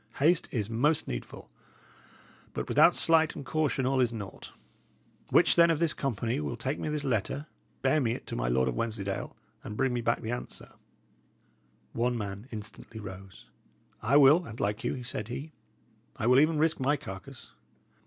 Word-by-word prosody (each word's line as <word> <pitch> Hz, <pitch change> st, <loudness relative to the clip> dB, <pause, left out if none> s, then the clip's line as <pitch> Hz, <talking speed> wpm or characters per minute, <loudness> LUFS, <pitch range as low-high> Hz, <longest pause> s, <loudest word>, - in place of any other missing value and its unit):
Haste 165 Hz, +5 st, +3 dB
is 110 Hz, -6 st, -2 dB
most 140 Hz, +8 st, +1 dB
needful; -, -, -7 dB, 1.0 s
but -, -, -3 dB
without -, -, +5 dB
sleight 160 Hz, -1 st, +4 dB
and 140 Hz, -, -7 dB
caution 150 Hz, -4 st, 0 dB
all 135 Hz, +1 st, +1 dB
is 125 Hz, -2 st, +3 dB
naught. 105 Hz, -4 st, -8 dB, 0.8 s
Which, -, -, +5 dB
then, 170 Hz, 0 st, +6 dB
of 165 Hz, -, +2 dB
this 165 Hz, -1 st, +2 dB
company 115 Hz, -, -2 dB
will 75 Hz, -2 st, -3 dB
take 135 Hz, +3 st, -3 dB
me -, -, -3 dB
this 150 Hz, -1 st, -2 dB
letter, 135 Hz, +3 st, -1 dB, 0.4 s
bear 135 Hz, +3 st, +3 dB
me 115 Hz, -3 st, +1 dB
it -, -, -7 dB
to -, -, -6 dB
my -, -, -1 dB
Lord 65 Hz, +2 st, +2 dB
of 65 Hz, -, 0 dB
Wensleydale, 100 Hz, -, -3 dB, 0.3 s
and 105 Hz, -, -7 dB
bring 130 Hz, -1 st, +1 dB
me 120 Hz, -, -1 dB
the 115 Hz, 0 st, -1 dB
answer 120 Hz, -, -5 dB
back?" -, -, -25 dB, 1.2 s
One 120 Hz, +1 st, 0 dB
man 100 Hz, +1 st, -5 dB
instantly 110 Hz, 0 st, -8 dB
arose. 95 Hz, -1 st, -10 dB, 0.6 s
"I 130 Hz, +7 st, +4 dB
will, 145 Hz, +5 st, +7 dB
an't 115 Hz, +1 st, -9 dB
like 105 Hz, +2 st, -1 dB
you," 125 Hz, -, -2 dB
said 110 Hz, -4 st, -5 dB
he. 140 Hz, +6 st, -6 dB, 0.7 s
"I -, -, -2 dB
will 125 Hz, +2 st, +6 dB
even 155 Hz, +2 st, +3 dB
risk 160 Hz, +1 st, +2 dB
my 140 Hz, +3 st, +2 dB
carcase." 95 Hz, -7 st, -10 dB
120 Hz, 175 wpm, -29 LUFS, 105-145 Hz, 1.2 s, will